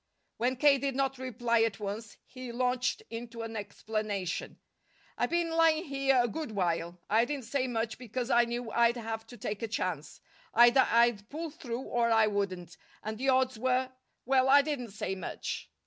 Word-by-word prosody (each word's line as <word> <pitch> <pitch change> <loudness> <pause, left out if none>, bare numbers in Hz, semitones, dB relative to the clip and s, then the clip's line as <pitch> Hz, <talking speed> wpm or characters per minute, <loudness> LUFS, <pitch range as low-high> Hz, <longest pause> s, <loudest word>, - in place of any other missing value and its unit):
When 250 +3 +1
K. 275 +1 +5
did 275 -1 -2
not 270 -1 0
reply 240 -2 0
at 225 -2 0
once, 210 +1 -5
he 255 -2 -8
launched 250 - 0
into 230 0 -6
an 225 0 -6
explanation. 205 -3 -3 0.6
"I've - - 0
been 340 -1 0
lying 325 -1 +4
here 275 -2 +2
a - - +1
good 300 -1 -5
while. 175 -2 -1
I 220 +2 +4
didn't 270 0 -3
say 260 +2 -1
much 225 -2 -2
because 250 +1 -4
I 240 0 +5
knew 235 -1 -4
I'd 235 +1 +3
have 225 -1 -5
to 245 - -11
take 210 -3 -4
a 230 - -2
chance. 175 -8 -3 0.4
Either 240 +3 +7
I'd 230 -3 +3
pull 320 +2 -5
through 250 -6 -5
or 240 -3 0
I 225 -1 +5
wouldn't, 195 -4 -3 0.3
and 215 +1 -5
the 270 +1 +1
odds 260 -2 +2
were 255 +1 +1 0.3
well, 265 +1 +3
I 285 +1 +7
didn't 280 -6 -3
say 195 -1 -4
much. 185 -3 -5
235 Hz, 180 wpm, -30 LUFS, 220-260 Hz, 0.6 s, Either